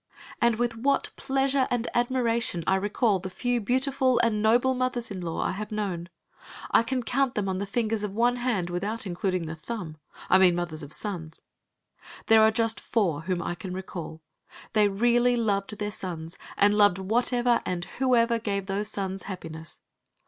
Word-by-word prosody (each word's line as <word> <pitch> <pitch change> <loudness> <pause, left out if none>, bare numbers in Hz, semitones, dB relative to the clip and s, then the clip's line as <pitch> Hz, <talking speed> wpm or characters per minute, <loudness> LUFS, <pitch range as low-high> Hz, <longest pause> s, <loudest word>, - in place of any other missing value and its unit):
And 235 -1 +4
with 235 0 -1
what 275 +4 +1
pleasure 270 0 +1
and 245 -1 -1
admiration 235 -7 0
I - - +2
recall 205 +1 +1
the 190 +1 -6
few 245 +5 -1
beautiful 260 +3 +1
and 215 -2 +1
noble 240 +4 +4
mothers 250 -3 -2
in 190 -2 -5
law 165 -2 -2
I - - 0
have 210 +3 -5
known! 190 -5 -3 0.6
I - - +6
can 250 +2 -2
count 260 +2 0
them 205 -2 -1
on 190 -1 -1
the 200 - -3
fingers 220 0 -1
of 210 - -2
one 240 +4 +2
hand 220 -8 -1
without 205 +6 -3
including 185 -1 -1
the 160 - -5
thumb. 165 -1 -6 0.3
I 190 - +5
mean 180 -2 +5
mothers 170 -2 -3
of 145 -1 -9
sons. 165 -2 -5 0.8
There 225 0 +6
are 220 - +7
just 225 0 +1
four 175 -10 0
whom 175 +1 -2
I 175 - -2
can 180 +1 -7
recall. 170 -4 -7 0.5
They 210 -1 +5
really 240 +4 +3
loved 210 -3 -1
their 210 0 -3
sons, 170 -5 -6 0.2
and 205 +1 +5
loved 205 -3 +5
whatever 240 +4 +1
and 175 -1 -3
whoever 235 -3 +3
gave 200 -3 -2
those 200 +2 -2
sons 195 -2 -4
happiness. 160 -4 -8
210 Hz, 180 wpm, -27 LUFS, 185-240 Hz, 0.8 s, are